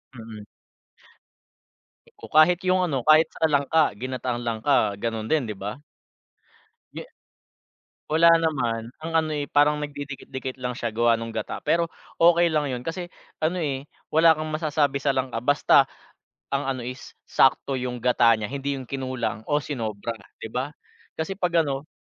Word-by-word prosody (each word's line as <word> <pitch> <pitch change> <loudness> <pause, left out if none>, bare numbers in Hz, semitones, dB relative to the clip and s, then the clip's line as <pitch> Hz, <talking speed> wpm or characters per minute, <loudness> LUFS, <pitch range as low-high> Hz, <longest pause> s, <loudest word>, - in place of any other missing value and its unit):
Mm. 110 -2 -9 1.7
Oo, - - -11
kahit 165 +3 +6
yung 185 0 +3
ano, 140 -9 -1
kahit 155 +1 +6
sa 160 - -1
langka, 150 -2 +2
ginataang 125 +1 -4
langka 110 -2 +1
gano'n 110 0 -3
din, 155 -4 +2
'di 105 - -4
ba? 105 +8 -6 1.1
Ye - - -8 1.0
wala 165 +2 +6
naman. 120 -8 -1
Ang 165 +1 -5
ano, 155 -1 0
eh, 145 -1 -3
parang 150 +1 +3
nagdidikit-dikit 140 -2 -6
lang 125 0 -3
siya 115 - -3
gawa 115 0 +3
nung 115 0 -6
gata 110 - -4
pero 170 0 +2 0.3
okey 170 0 +5
lang 150 -2 +1
yun 125 -1 -4
kasi 175 +2 -4 0.3
ano 160 +4 0
eh, 145 -4 -3 0.3
wala 160 +1 +6
kang 155 0 -4
masasabi 150 -3 0
sa 140 - +1
langka. 130 -3 -1
Basta 145 +4 +4 0.6
ang 140 0 -1
ano 130 -3 -3
is 125 +2 -8
sakto 135 0 +2
yung 125 0 -3
gata 125 -1 +4
niya, 110 -1 -4
hindi 140 0 -2
yung 130 - -7
kinulang 130 -5 -3
o 145 - +2
sinobra 115 -5 -4 0.2
'di 110 - -8
ba 130 +3 -2 0.5
kasi 160 +4 -3
pag-ano 155 -5 0
140 Hz, 155 wpm, -24 LUFS, 120-155 Hz, 1.7 s, kahit